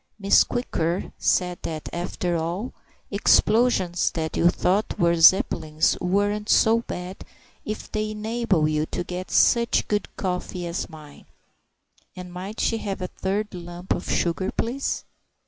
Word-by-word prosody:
Miss 200 -1 +5
Quicker 175 -8 -2
said 180 -1 +1
that, 155 -2 -5
after 175 0 -2
all, 170 +9 -3 0.4
explosions 205 -3 +3
that 160 -1 -3
you 170 - +4
thought 190 +4 0
were 170 0 +3
Zeppelins 160 -2 +4
weren't 205 +3 0
so 225 +1 +5
bad 180 -3 -7 0.4
if 215 0 -6
they 215 0 -1
enabled 215 -7 0
you 155 0 0
to 175 - -3
get 180 +1 -6
such 235 0 +3
good 210 -2 -1
coffee 180 -1 -3
as 170 +1 -4
mine; 150 -3 -13 0.9
and 180 -1 -9
might 190 +5 -7
she 225 - +1
have 195 -2 -4
a 180 -1 -4
third 205 +2 -3
lump 175 0 -4
of - - -5
sugar, 175 +2 0
please? 255 +4 -2
185 Hz, 140 wpm, -24 LUFS, 175-210 Hz, 0.9 s, Miss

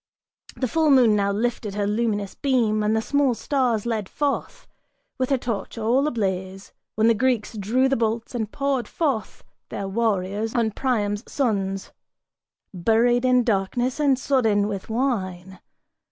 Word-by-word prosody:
The 255 - -1
full 315 +5 +2
moon 250 -6 +5
now 200 -1 +1
lifted 215 -1 -2
her 205 -1 0
luminous 210 -2 -1
beam 235 -6 +1
and 210 +1 +1
the 220 - 0
small 285 -2 +2
stars 245 -5 0
Led 220 -4 -2
forth, 295 - -2 0.5
with 255 - 0
her 270 - +3
torch 235 -2 -4
all 240 +6 +2
ablaze; 190 -6 -3 0.2
when 220 +1 +3
the 230 - +6
Greeks 235 -1 0
drew 225 +6 +1
the 270 - +1
bolts 225 0 -2
And 220 -3 -3
poured 275 -5 -1
forth 270 - -2 0.3
their 200 - -4
warriors, 210 0 -1
on 230 -2 +1
Priam's 210 -3 -1
sons, 195 -7 -1 0.8
buried 230 +7 +2
in 250 -1 +4
darkness 240 +5 0
And 280 -3 +3
sodden 225 -7 +2
with 200 -1 -5
wine. 190 -7 -2
225 Hz, 150 wpm, -23 LUFS, 205-255 Hz, 0.8 s, the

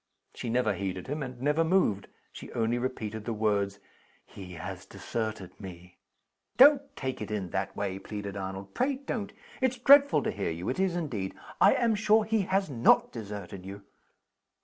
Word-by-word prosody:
She 120 - -5
never 115 -2 +2
heeded 95 -1 -4
him, 150 +3 -4
and 130 -3 -6
never 150 +5 +2
moved. 160 - +2 0.2
She - - -10
only 115 +1 0
repeated 110 -4 -4
the 115 0 -3
words 100 -2 0 0.5
"He 90 -2 -10
has 80 - -7
deserted 110 -5 -4
me!" 90 -2 -11 0.6
"Don't 280 +2 +8
take 130 -3 -4
it 105 - -5
in 100 -5 -3
that 95 0 -2
way!" 95 -1 -2
pleaded 100 -1 -6
Arnold 95 0 -6
"pray 275 +1 +1
don't! 255 -6 -4 0.3
It's 260 -1 +1
dreadful 280 +3 +6
to - - 0
hear 100 - -2
you; 85 +3 -4
it 130 - -2
is 190 -2 +1
indeed. 120 - -3 0.3
I - - +7
am 230 -2 +2
sure 215 +1 +3
he 220 0 +1
has 195 +1 +2
not 120 -6 +3
deserted 100 -4 -7
you." 100 +1 -9
110 Hz, 170 wpm, -29 LUFS, -, 0.6 s, Don't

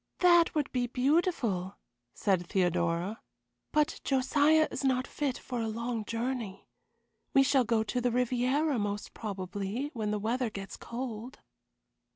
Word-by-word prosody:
"That 345 -2 +5
would 300 -3 0
be 245 -1 0
beautiful," 250 - +1 0.4
said 185 -3 +1
Theodora, 175 +2 0 0.5
"but 300 0 +1
Josiah 290 +4 +3
is - - -4
not 260 -1 +2
fit 280 -4 -2
for 245 -2 -4
a 225 - -1
long 230 0 -3
journey. 230 -4 -3 0.7
We 270 - +7
shall 270 -1 +4
go 225 -1 +2
to 245 +3 -2
the 245 - +2
Riviera, 250 +4 +1
most 205 0 -3
probably, 200 +5 -4
when 220 -4 -2
the 210 - 0
weather 230 +4 -1
gets 195 -2 -7
cold." 235 0 -6
240 Hz, 140 wpm, -30 LUFS, 205-270 Hz, 0.7 s, We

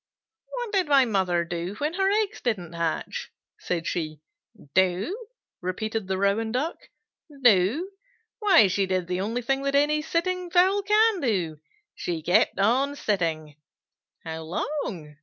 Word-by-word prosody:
"What 485 -3 -4
did 380 -5 +1
my 275 -3 +5
mother 185 -6 +1
do 175 +3 -4
when 300 +7 -2
her 385 +1 +2
eggs 415 0 0
didn't 185 -9 -2
hatch?" 165 -1 -3 0.3
said 170 -2 -3
she. 155 -3 -3 0.5
"Do?" 190 - +1 0.3
repeated 215 +3 -3
the 190 0 -1
Rouen 200 +3 +1
Duck. 275 +8 -1 0.7
"Do? 240 - +4 0.5
Why 390 - +6
she 195 +1 0
did 185 -1 0
the 180 +1 -2
only 230 +5 -2
thing 270 +3 0
that 275 0 -1
any 300 +2 +3
sitting 360 +3 -1
fowl 375 +3 +4
can 425 +1 +3
do. 180 - -1 0.3
She 165 -3 -4
kept 175 - +3
on 260 +8 +2
sitting." 160 - -2 0.7
"How 160 0 -5
long?" 165 - -4
220 Hz, 140 wpm, -26 LUFS, -, 0.7 s, Why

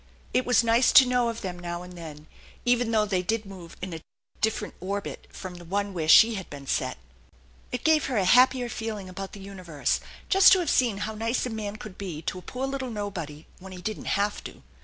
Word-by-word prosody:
It 255 - +1
was 250 -1 +4
nice 230 +2 +4
to 265 - +9
know 250 -1 +2
of 230 0 -5
them 180 -2 -5
notf 175 0 -5
and 180 - -11
then, 155 -3 -9 0.4
even 245 -1 +2
though 215 -2 +3
they 190 -3 0
did 220 +4 -1
move 185 -4 -11
in 185 -2 -4
a 160 - -6 0.4
different 215 -1 -1
orbit 200 +3 -5
from 185 -2 -8
the 175 0 -11
one 200 +3 -2
where 160 -3 -2
she 225 +8 +8
had 190 -4 -6
been 140 -1 -9
set. - - -1 0.7
It 250 - -4
gave 315 -1 +4
her 255 - -1
a 195 - +2
happier 250 +4 +5
feeling 225 -4 -5
about 195 +1 -7
the 205 - -9
universe 185 -7 -2 0.3
just 385 -1 +7
to 380 - +4
have 340 -4 0
seen 235 -6 +2
how 220 - -4
nice 230 +4 -1
a 250 - -4
man 210 -2 -4
could 215 -3 -10
be 170 -6 -5
to 185 - -3
a - - -12
poor 255 +7 -4
little 270 -1 -3
nobody 185 -9 -5
when 190 0 -10
he 180 - -9
didn't 215 -1 -2
have 205 +1 -1
to. - - -10
205 Hz, 225 wpm, -26 LUFS, 180-235 Hz, 0.7 s, to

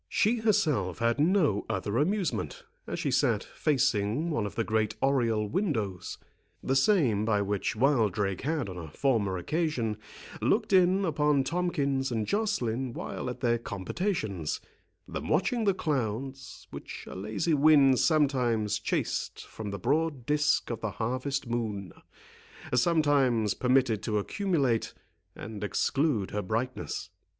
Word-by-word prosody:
She 225 +2 +2
herself 150 - +1
had 115 +3 +1
no 155 - +3
other 105 +4 -1
amusement, 200 - -1 0.2
as - - -3
she - - -1
sat - - +2
facing 140 - 0
one 110 -8 0
of - - -9
the 115 - 0
great 110 -1 0
oriel 115 -6 +1
windows, 110 - -2 0.5
the 135 - 0
same 135 - +3
by 105 -2 +1
which 100 +3 -1
Wildrake 105 -7 +1
had 150 -4 -1
on 90 -2 -6
a 80 - -7
former 105 - 0
occasion 125 - -1 0.4
looked - - +1
in 190 +1 +4
upon 150 -3 +2
Tomkins 140 -5 -1
and 110 -2 -1
Joceline 130 - -1
while - - -5
at 125 - -7
their 120 -2 +2
compotations, 100 - -3 0.5
than - - -5
watching 220 +8 +1
the 200 - +4
clouds, 135 - -3
which - - -8
a - - -9
lazy 105 - -1
wind 140 -3 +5
sometimes 125 - +2
chased - - -2
from 110 -2 -7
the 100 - -4
broad 145 - 0
disk 150 -2 +1
of 115 - -4
the 110 - -1
harvest 130 +6 -2
moon, 110 -6 -3 0.8
sometimes 130 - +3
permitted 125 -4 +2
to 105 -2 -1
accumulate, 140 - 0 0.4
and 105 -1 -7
exclude 130 0 0
her 105 - -1
brightness. 115 +6 -3
130 Hz, 135 wpm, -29 LUFS, 105-155 Hz, 0.8 s, wind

